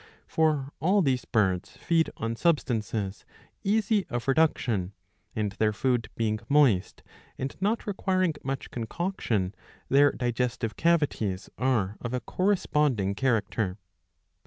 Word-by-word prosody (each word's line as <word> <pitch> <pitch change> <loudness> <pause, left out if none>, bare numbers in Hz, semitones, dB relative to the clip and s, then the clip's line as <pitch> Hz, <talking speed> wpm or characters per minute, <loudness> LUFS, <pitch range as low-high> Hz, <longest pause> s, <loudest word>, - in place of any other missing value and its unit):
For 155 -4 +1
all 190 +4 +3
these 130 -4 +1
birds 95 -4 0
feed 165 -1 +2
on 115 +1 -2
substances 115 - 0 0.4
easy 210 -1 +2
of 120 -1 -4
reduction, 125 - +1 0.4
and 105 -2 -1
their 105 +2 +1
food 120 +2 0
being 110 -2 0
moist 135 -10 +3 0.3
and 135 +1 -4
not 215 +4 0
requiring 185 -4 +1
much 135 0 -4
concoction, 115 - -2 0.4
their 140 +1 +6
digestive 120 -2 -2
cavities 145 - 0
are 110 -6 +1
of 120 +1 -3
a - - 0
corresponding 150 - +1
character. 105 -5 0
125 Hz, 115 wpm, -27 LUFS, 110-160 Hz, 0.4 s, their